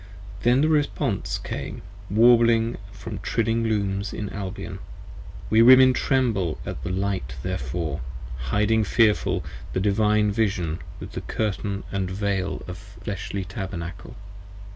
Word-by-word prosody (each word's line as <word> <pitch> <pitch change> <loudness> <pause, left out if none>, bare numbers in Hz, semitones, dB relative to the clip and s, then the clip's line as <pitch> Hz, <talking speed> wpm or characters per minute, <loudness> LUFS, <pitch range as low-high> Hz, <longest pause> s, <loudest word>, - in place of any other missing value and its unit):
Then 120 +4 +4
the 155 - +4
response 150 -2 0
came - - -6 0.3
warbling 115 +1 +5
from 100 -1 -7
trilling 115 0 0
Looms 100 -2 -1
in 105 - -4
Albion. 95 -2 -6 0.7
We 110 +1 +6
Women 130 +2 +8
tremble 115 - +1
at - - -5
the 85 - -4
light 95 -9 -2
therefore: 70 +3 -3 0.5
hiding 105 - +3
fearful, 105 0 +2
40 - - -10 0.2
The - - 0
Divine 105 +1 +3
Vision 100 -7 0 0.2
with - - -7
Curtain 100 -2 -2
& - - -11 0.2
Veil 100 -2 -1
& 90 - -4 0.3
fleshly 100 -1 -3
Tabernacle. 90 -2 -6
105 Hz, 120 wpm, -25 LUFS, 95-115 Hz, 0.7 s, Women